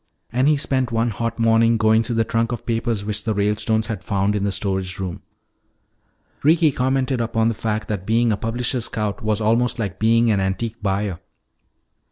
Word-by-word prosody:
And 125 +4 +2
he 150 -1 +4
spent 130 -3 0
one 115 +1 +1
hot 115 +2 -3
morning 115 0 +3
going 110 0 +4
through 115 +1 -3
the 115 - +3
trunk 115 +1 -1
of 120 - -5
papers 115 -3 -1
which 105 0 -2
the 110 -2 -1
Ralestones 105 +2 +1
had 110 -4 -5
found 100 0 0
in 100 - -1
the 100 - 0
storage 95 -2 -2
room. 95 -3 -5 1.2
Ricky 160 +1 +4
commented 130 0 0
upon 115 0 +1
the - - -1
fact 110 0 -3
that 100 -4 -2
being 115 +1 +3
a - - +2
publisher's 120 +2 -1
scout 105 -3 -3
was 110 -1 0
almost 115 +2 +1
like 100 -5 -4
being 115 +1 +3
an 100 - +2
antique 100 +4 -2
buyer. 100 -3 -1
115 Hz, 190 wpm, -21 LUFS, 105-115 Hz, 1.2 s, he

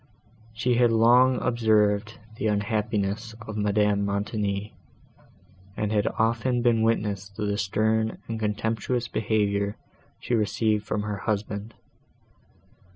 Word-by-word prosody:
She 120 +2 0
had 120 -1 +4
long 120 +3 +5
observed 110 -2 +2 0.2
the 110 - -1
unhappiness 105 +1 -1
of 110 - -7
Madame 105 -1 +1
Montoni, 100 0 -2 1.0
and 105 0 -1
had 105 -2 +1
often 120 +2 +1
been 115 -2 +3
witness 105 -3 0
to 105 - -3
the 100 0 0
stern 110 +3 0
and 115 -1 -4
contemptuous 110 +3 -1
behaviour 100 -2 0 0.4
she 120 - -4
received 110 -1 +1
from 105 -1 -1
her 105 -1 -3
husband. 105 +1 -3
110 Hz, 115 wpm, -26 LUFS, 105-115 Hz, 1.0 s, long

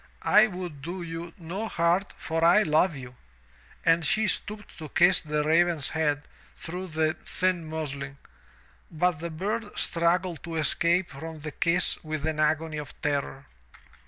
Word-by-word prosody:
I 215 +1 +6
would 180 -7 -7
do 175 +5 -5
you 165 0 -6
no 190 +5 -4
hurt 175 +1 +1
for 165 0 -3
I 175 +6 +6
love 160 +1 +3
you. 125 -2 -9 0.7
And 165 0 +4
she 215 +7 +2
stooped 210 0 -2
to 155 -2 -7
kiss 175 +2 +5
the 150 -1 -1
raven's 165 -1 +2
head 150 -2 0 0.3
through 180 +3 -5
the 160 -1 0
thin 180 -3 0
muslin, 140 -3 -5 0.7
but 170 0 +1
the 170 +1 -4
bird 205 +7 -3
struggled 170 0 +1
to 165 -1 -6
escape 170 +3 +2
from 160 +2 -8
the 150 0 -5
kiss 170 +5 +1
with 155 -1 -3
an 155 -1 -1
agony 155 +1 +1
of 150 - -9
terror. 140 -2 -1
165 Hz, 155 wpm, -27 LUFS, 155-180 Hz, 0.7 s, I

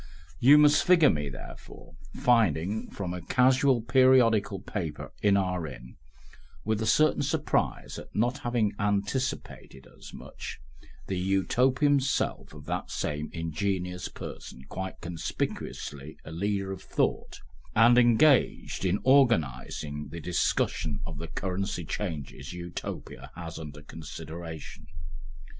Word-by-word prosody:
You 140 +5 +8
must 150 0 +6
figure 175 -4 +6
me, 75 -2 -2
therefore, 65 - -11 0.2
finding 105 - +2
from 90 -3 -5
a 90 - -5
casual 130 - +3
periodical 120 -5 +4
paper 80 -8 -5
in 100 -1 +4
our 90 -4 -1
inn, 60 -3 -11 0.7
with 110 0 0
a 110 - -1
certain 155 +7 +4
surprise - - -1
at - - -13
not 120 +6 +1
having 120 -5 0
anticipated 105 - -2
as - - -12
much, - - -8 0.5
the 95 -2 -2
Utopian 125 - +2
self 135 - -1
of 75 -2 -12
that - - -3
same 75 0 -3
ingenious 90 +2 -2
person 65 - -9
quite 95 +5 -6
conspicuously 80 -3 -5
a - - -8
leader 95 +3 -2
of 95 - -6
thought, - - -1 0.4
and 120 +2 +7
engaged 125 +2 +3
in 95 +1 +2
organising 75 - +2
the 85 - -7
discussion 80 -3 0
of 80 -4 -7
the 85 - -5
currency 95 +1 -3
changes 75 -6 -5
Utopia 85 -6 -7
has 80 -2 -7
under 75 -1 -9
consideration. 80 +1 -8
95 Hz, 120 wpm, -28 LUFS, 80-120 Hz, 0.7 s, You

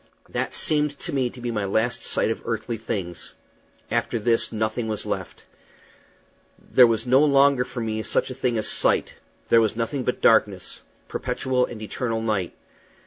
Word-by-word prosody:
That - - -2
seemed 150 -2 +2
to - - -5
me 130 -3 +1
to 125 - -13
be 120 0 -3
my 105 -3 -2
last 110 +5 0
sight - - 0
of - - -4
earthly 115 - -3
things. 95 -6 -5 0.6
After - - 0
this 115 +1 +1
nothing 110 +1 -2
was 110 -1 -4
left. - - -5 1.1
There 125 -2 +5
was 115 0 0
no 130 +3 +5
longer 140 -3 +4
for 125 -1 -6
me 110 -1 -2
such 120 - -1
a - - -4
thing 125 -2 -1
as 110 - -1
sight; - - +2 0.4
there 115 - +6
was 110 -1 0
nothing 125 +4 -2
but 125 - -1
darkness 105 -5 +2 0.3
perpetual 130 -1 -1
and 110 -2 -8
eternal 115 +1 -2
night. 105 -6 -2
115 Hz, 170 wpm, -24 LUFS, 110-125 Hz, 1.1 s, there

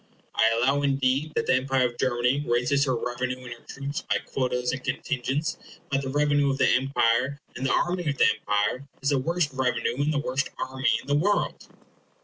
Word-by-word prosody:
I 110 - +4
allow 135 +5 +2
indeed 140 +2 +1
that - - 0
the - - +3
empire 130 0 +2
of 120 -1 -4
Germany 125 +2 +1
raises 125 +4 +2
her 130 -2 +1
revenue 125 +1 -2
and 120 -1 -6
her 120 - -17
troops 140 +5 -4
by - - 0
quotas 125 -1 -2
and 130 0 -5
contingents; 135 +2 -2 0.3
but 135 0 +1
the 135 - -4
revenue 145 0 +2
of 135 - 0
the - - +3
empire, 130 +1 +2 0.2
and 130 +2 -2
the - - +1
army 175 -2 +1
of 140 - -2
the - - +5
empire, 105 +7 0 0.2
is 140 - +2
the 140 -2 +2
worst 165 +1 0
revenue 130 -1 0
and 150 +2 +1
the 150 - 0
worst 140 -1 -1
army 130 0 -1
in - - -18
the 145 - +1
world. 200 +8 0
135 Hz, 200 wpm, -26 LUFS, 125-145 Hz, 0.3 s, the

